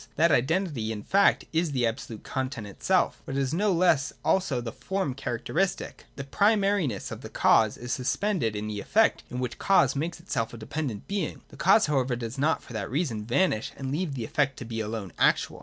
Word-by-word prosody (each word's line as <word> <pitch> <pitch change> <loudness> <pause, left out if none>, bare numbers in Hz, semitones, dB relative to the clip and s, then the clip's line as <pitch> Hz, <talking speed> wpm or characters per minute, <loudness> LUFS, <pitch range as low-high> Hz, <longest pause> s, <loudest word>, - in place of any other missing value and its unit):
That 165 +2 +4
identity 140 - +1
in 105 -2 -5
fact 200 +1 +3
is 160 -2 +1
the 125 -3 +1
absolute 115 -1 -4
content 130 -4 -3
itself: 100 - 0
but 135 - -6
it - - +1
is 135 +1 -1
no 200 +4 +2
less 165 -6 +3
also 170 -10 +2
the 120 -1 -5
form 190 - -2
character 120 -3 -5
istic. 190 +3 -1
The 140 - -5
primariness 200 - +1
of - - -6
the - - -8
cause 110 -2 +3
is 120 0 -6
suspended 140 - 0
in 105 +1 -3
the 105 -1 -4
effect 220 - +2
in 125 - -5
which 125 -1 -2
the - - -11
cause 170 -9 +3
makes 165 +4 -3
itself 120 -9 -3
a - - -9
dependent 115 -1 -4
being. 195 -5 -3
The - - -14
cause 205 +4 +5
however 135 -4 +1
does 120 +2 -6
not 155 +3 +1
for 120 - -12
that 105 -3 -3
reason 125 -6 -2
vanish 125 - +1
and 135 -1 -4
leave 155 -1 -2
the 120 -4 -3
effect 140 0 0
to 120 - -7
be 115 -1 -4
alone 110 -3 -4
actual. - - +2
135 Hz, 210 wpm, -27 LUFS, 115-170 Hz, -, cause